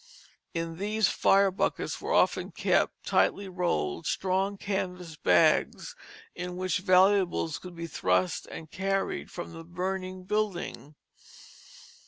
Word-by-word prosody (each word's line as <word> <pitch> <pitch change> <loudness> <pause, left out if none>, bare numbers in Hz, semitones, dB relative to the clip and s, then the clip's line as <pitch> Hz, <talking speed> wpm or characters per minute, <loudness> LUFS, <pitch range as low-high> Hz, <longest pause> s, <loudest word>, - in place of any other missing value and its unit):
In 165 0 -3
these 210 0 +1
fire 195 0 +4
buckets 185 - -2
were - - -4
often - - +2
kept, - - 0
tightly 200 0 +2
rolled, 125 - -1
strong 195 +2 0
canvas 180 -4 -3
bags, 90 - +2 0.4
in 180 0 -5
which 185 +1 0
valuables 185 -3 +3
could 180 -1 -10
be 170 0 -5
thrust 90 - 0
and 160 -1 -9
carried 195 +1 -2
from 175 -1 -7
the 165 0 -9
burning 185 +2 -4
building. 185 -7 -3
185 Hz, 120 wpm, -28 LUFS, 165-195 Hz, 0.4 s, fire